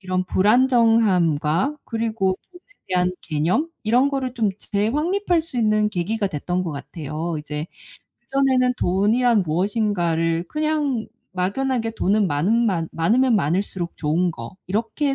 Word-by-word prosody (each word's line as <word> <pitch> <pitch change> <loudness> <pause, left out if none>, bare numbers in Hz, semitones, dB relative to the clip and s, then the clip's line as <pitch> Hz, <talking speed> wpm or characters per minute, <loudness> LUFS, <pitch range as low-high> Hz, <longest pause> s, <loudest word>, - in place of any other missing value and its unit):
이런 185 -1 -1
불안정함과 210 - +3
그리고 225 -5 -1
돈에 355 -1 -15 0.3
대한 180 0 +1
개념 170 - 0
이런 245 +5 +3
거를 260 -3 -2
좀 225 -5 +1
재확립할 315 - 0
수 315 -6 -9
있는 215 -2 +2
계기가 210 +3 -1
됐던 180 +2 -2
것 165 - -3
같아요. 155 +2 -5
이제 150 +1 -5 0.5
그전에는 255 0 +1
돈이란 215 +4 +2
무엇인가를 170 -2 0
그냥 305 -6 -1 0.3
막연하게 225 +5 -1
'돈은 205 +1 +2
많은 195 +10 +1
많 165 -5 -1
많으면 230 +8 +3
많을수록 180 +1 -1
좋은 165 +4 +1
거.' 115 +6 -9
이렇게 225 - -1
205 Hz, 295 characters per minute, -22 LUFS, 175-245 Hz, 0.5 s, 불안정함과